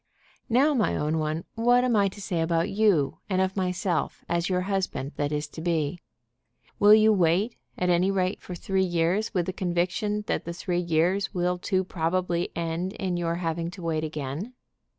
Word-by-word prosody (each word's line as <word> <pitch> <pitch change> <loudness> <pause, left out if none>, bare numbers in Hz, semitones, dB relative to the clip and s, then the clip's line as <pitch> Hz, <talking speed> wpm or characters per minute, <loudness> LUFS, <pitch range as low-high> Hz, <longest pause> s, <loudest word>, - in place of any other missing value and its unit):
"Now, 270 +6 +4
my 220 - +1
own 155 +2 0
one, 155 +2 -2
what 245 +2 +3
am 250 -2 +2
I 200 -1 +4
to 195 +2 -8
say 180 -4 -2
about 165 +2 +1
you, 195 -9 +2
and 185 -1 +1
of 190 0 +1
myself, 180 -2 -1
as 170 +1 0
your 180 -1 +1
husband 185 -7 -2
that 145 0 -1
is 150 0 -2
to 160 - -8
be? 165 0 -1 0.8
Will 205 +1 +8
you 215 0 +5
wait, 190 +5 +2 0.2
at 180 - 0
any 175 +2 +3
rate, 190 0 0
for 180 - -7
three 190 +2 -1
years 175 +4 +1
with 175 -2 +2
the 185 - -3
conviction 185 +4 -1
that - - -1
the 170 - -5
three 180 0 -2
years 175 +4 +1
will 180 0 0
too 185 +1 0
probably 175 0 -1
end 170 +3 -2
in 190 -5 -2
your 170 -1 -1
having 165 -1 -2
to 180 0 -10
wait 160 -2 -1
again? 155 - -4
180 Hz, 190 wpm, -26 LUFS, 165-195 Hz, 0.8 s, Will